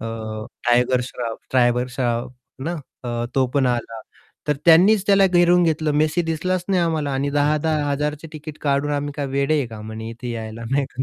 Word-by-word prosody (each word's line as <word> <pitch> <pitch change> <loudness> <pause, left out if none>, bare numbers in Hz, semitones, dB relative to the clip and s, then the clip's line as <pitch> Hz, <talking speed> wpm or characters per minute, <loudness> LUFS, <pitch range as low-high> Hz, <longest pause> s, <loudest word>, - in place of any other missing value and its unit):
अ, 110 -1 -5 0.2
tiger 125 +1 +3
Shroff 120 -2 -5
tiger 125 -1 +3
Shroff 120 -1 -2 0.3
ना? 170 +3 -2 0.3
अ, 120 -1 -2
तो 130 -1 +3
पण 140 -2 +3
आला. 120 -2 -2 0.5
तर 150 - +2
त्यांनीच 185 +5 +6
त्याला 195 -1 +5
घेरून 175 -1 +4
घेतलं, 155 -2 +1
मेसी 155 +3 +2
दिसलाच 170 +3 -1
नाही 190 -2 +2
आम्हाला, 160 -4 0
आणि 135 +1 -1
10,000-10,000 150 0 +1
चे 165 - -8
टिकेट 155 0 -8
काढून 145 0 +1
आम्ही 145 0 -2
काय 145 -2 -2
वेडे 140 +3 +1
आहे 140 - 0
का 110 -2 -9
म्हणे 110 +1 -7
इथे 120 +1 -7
यायला, 110 0 -6
नाही 140 +1 +2
का? 130 - -3
140 Hz, 185 wpm, -22 LUFS, 120-155 Hz, 0.5 s, त्यांनीच